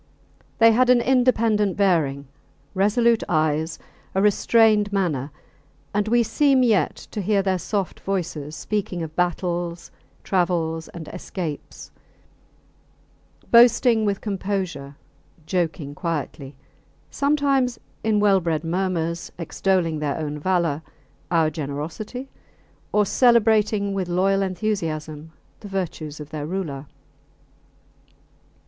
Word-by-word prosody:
They 230 0 +7
had 250 +3 +3
an 250 -1 +6
independent 230 -5 +2
bearing, 155 -8 +1 0.5
resolute 220 +4 +3
eyes, 155 0 0 0.4
a 190 - +3
restrained 210 0 +4
manner; 160 -9 -1 0.6
and 205 +1 0
we 235 +2 +3
seem 270 +2 +3
yet 220 -5 +2 0.2
to 210 - -3
hear 200 0 +1
their 190 -1 0
soft 195 +1 -3
voices 160 -6 -3
speaking 195 -3 -3
of 160 -1 -8
battles, 175 -1 -2 0.3
travels, 170 -3 0
and 165 -3 -9
escapes; 170 -3 -7 1.6
boasting 235 -1 +6
with 200 -1 -1
composure, 190 -9 -3 0.5
joking 160 -4 -2
quietly; 150 -4 -4 0.6
sometimes 280 -4 +1 0.2
in 215 -1 +2
well 200 -2 +4
bred 165 -3 -1
murmurs 170 -1 -2
extolling 170 -1 0
their 145 -2 -2
own 150 -2 -4
valour, 170 -3 0 0.5
our 165 -2 +2
generosity; 155 - -5 0.6
or 210 0 +3
celebrating 215 -3 +3
with 190 -2 -2
loyal 195 +3 +2
enthusiasm 160 -6 -3 0.3
the 205 - -10
virtues 170 -6 -4
of 150 -1 -9
their 150 -1 -4
ruler. 155 -6 -4
185 Hz, 105 wpm, -23 LUFS, 160-210 Hz, 1.6 s, They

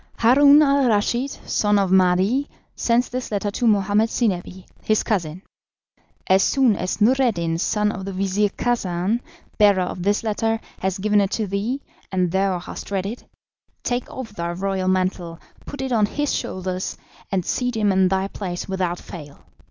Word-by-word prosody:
"Haroun 280 +5 +6
al 280 -2 +3
Raschid, 235 +5 +1
son 210 -5 0
of 195 -2 +1
Mahdi, 190 +9 +3 0.3
sends 240 +1 +1
this 250 -1 -5
letter 205 0 -1
to 235 +3 0
Mohammed 210 +1 +3
Zinebi, 190 -5 -2 0.2
his 215 -1 +1
cousin. 180 -4 -2 0.8
As 190 +1 +4
soon 255 -3 +3
as 185 +2 -3
Noureddin, 210 -9 +2
son 210 +3 +1
of 195 -3 -6
the 195 - -4
Vizir 195 +2 0
Khacan, 200 -2 -1 0.4
bearer 200 -3 +5
of 180 0 -5
this 205 +4 +1
letter, 225 +1 0 0.2
has 190 0 -1
given 205 +1 +2
it 195 - 0
to 220 - -1
thee, 205 +8 -3 0.3
and 180 -2 0
thou 190 0 +1
hast 175 - -8
read 195 -2 -2
it, 225 +5 -6 0.6
take 245 0 -2
off 260 -3 -7
thy 170 -4 -4
royal 190 +1 -2
mantle, 185 -2 -1 0.3
put 285 -2 -5
it 265 - -3
on 215 -3 +3
his 290 +6 -2
shoulders, 185 0 -3 0.3
and 185 -3 0
seat 250 -2 -1
him 210 -2 +2
in 190 0 +3
thy 190 +1 0
place 180 -3 -5
without 185 -2 -2
fail. 150 -6 -11
200 Hz, 165 wpm, -22 LUFS, 185-230 Hz, 0.8 s, Haroun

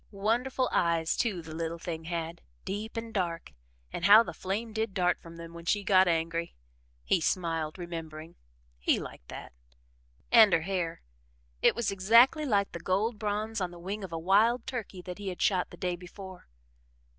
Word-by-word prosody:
Wonderful 240 +6 0
eyes, 165 -1 +1
too, 195 -8 -1
the 160 -1 -9
little 165 +1 -3
thing 165 -1 -6
had 165 0 -4 0.2
deep 215 +4 -5
and 225 0 -5
dark 170 -4 -2 0.4
and 170 - -2
how 210 +4 +9
the - - -7
flame 215 +4 -4
did 220 -2 -2
dart 180 -1 +1
from 165 0 -12
them 165 0 -9
when 170 0 -10
she 205 +4 +1
got 190 -1 +5
angry! 165 0 -1 0.5
He 180 - +2
smiled, 165 -2 -1
remembering 165 -2 -7 0.5
he - - +2
liked - - -9
that. - - -9 0.8
And 220 -4 +8
her 165 - +4
hair 175 -2 -3 0.6
it - - +5
was 235 -4 -1
exactly 230 +10 +5
like 200 -4 +1
the 170 - -6
gold 205 +6 0
bronze 215 +1 -2
on 180 - -1
the 175 - -12
wing 195 +4 -5
of 190 - -7
a 165 - -3
wild 210 +8 +3
turkey 210 -7 -6
that 180 +1 -7
he 200 - -6
had 180 -2 -4
shot 185 -3 +2
the - - -12
day 180 -1 -1
before. 185 +1 -11
185 Hz, 180 wpm, -29 LUFS, 170-210 Hz, 0.8 s, how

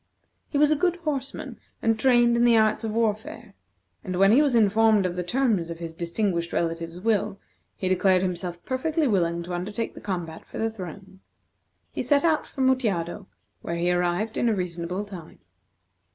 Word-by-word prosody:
He 290 - -1
was 300 +1 +4
a - - +4
good 355 +3 +1
horseman, 300 -6 -4 0.2
and 225 -1 +1
trained 240 -1 +4
in 235 - +3
the 235 -1 +5
arts 215 +1 +2
of 225 - -2
warfare, 220 0 -2 0.5
and 185 - -4
when 195 +2 +5
he 255 +6 +6
was 285 -5 +2
informed 215 -1 +4
of 175 -1 -2
the 180 - -2
terms 205 -3 0
of 170 - -5
his 165 -1 -7
distinguished 170 +1 -2
relative's 165 0 -2
will, 205 -1 0 0.4
he 190 - -3
declared 185 0 +3
himself 175 -1 -4
perfectly 305 +4 0
willing 170 -5 +1
to 175 +1 -6
undertake 205 +6 -3
the - - -11
combat 175 -5 -4
for - - -10
the 225 0 0
throne. 190 -1 -9 0.7
He - - -3
set 285 0 +2
out 320 -2 +2
for 270 - -6
Mutjado, 205 -8 0 0.3
where 170 - -4
he 175 +1 +1
arrived 180 +5 0
in 240 - +2
a 220 - +1
reasonable 180 +1 -3
time. 185 -6 -10
200 Hz, 180 wpm, -25 LUFS, 175-235 Hz, 0.7 s, he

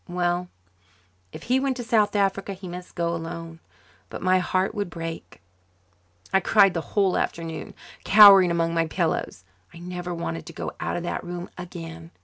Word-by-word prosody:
Well, 175 0 -1 0.8
if - - -10
he 255 +2 +2
went 265 -1 -1
to 245 - -4
South 215 -2 +2
Africa 195 0 0
he 190 0 -10
must 180 +1 -9
go 170 -1 -1
alone. 165 0 -7 0.5
But - - -7
my 185 0 +4
heart 185 +2 0
would 205 -4 -3
break. 165 -1 -7 0.9
I 190 - +5
cried 195 0 +4
the 165 - -2
whole 195 +1 0
afternoon, 165 -1 -4 0.3
cowering 200 -3 +8
among 165 -1 0
my 165 -1 +1
pillows. 160 - -2 0.3
I - - -13
never 180 +1 -6
wanted 80 - -5
to - - -9
go - - -5
out - - -2
of 175 - -4
that 175 - -3
room 175 0 -7
again. 165 -2 -9
175 Hz, 170 wpm, -24 LUFS, 165-195 Hz, 0.9 s, cowering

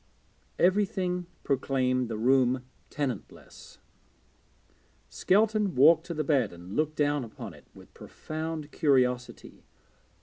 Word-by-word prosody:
Everything 180 -2 +1 0.2
proclaimed 130 -2 0
the 110 - -4
room 125 +1 +2 0.2
tenantless. 135 -7 -6 1.3
Skelton 210 -1 +1
walked 160 +5 +5
to 170 - -5
the 155 - -1
bed 135 -7 +1
and 85 +3 -10
looked 155 0 0
down 145 -2 +1
upon 115 - -9
it - - -18
with - - -16
profound 155 -1 -6
curiosity. 125 -5 0
145 Hz, 105 wpm, -28 LUFS, 125-165 Hz, 1.3 s, walked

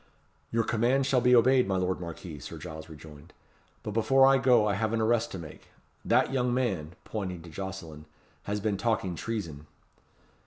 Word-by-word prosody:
"Your 115 0 +1
commands 120 +5 +1
shall 130 -2 +3
be 125 +1 +5
obeyed, 125 +1 +5
my 95 -1 0
lord 90 0 -1
Marquis," 85 -2 -8
Sir - - -8
Giles 80 0 -9
rejoined; 80 +1 -13 0.5
"but 105 - -4
before 125 +5 +4
I 135 0 +5
go 120 -5 +4
I 105 - +1
have 110 +2 -1
an 115 - +1
arrest 115 +1 +1
to - - -4
make. 80 -4 -11 0.4
That - - +2
young 125 -2 +1
man," 95 -11 -1
pointing 95 -6 -5
to 85 - -11
Jocelyn, 85 -4 -7 0.4
"has 105 +1 -2
been 105 -1 -1
talking 105 -4 0
treason." 85 -8 -5
105 Hz, 180 wpm, -28 LUFS, 85-120 Hz, 0.5 s, be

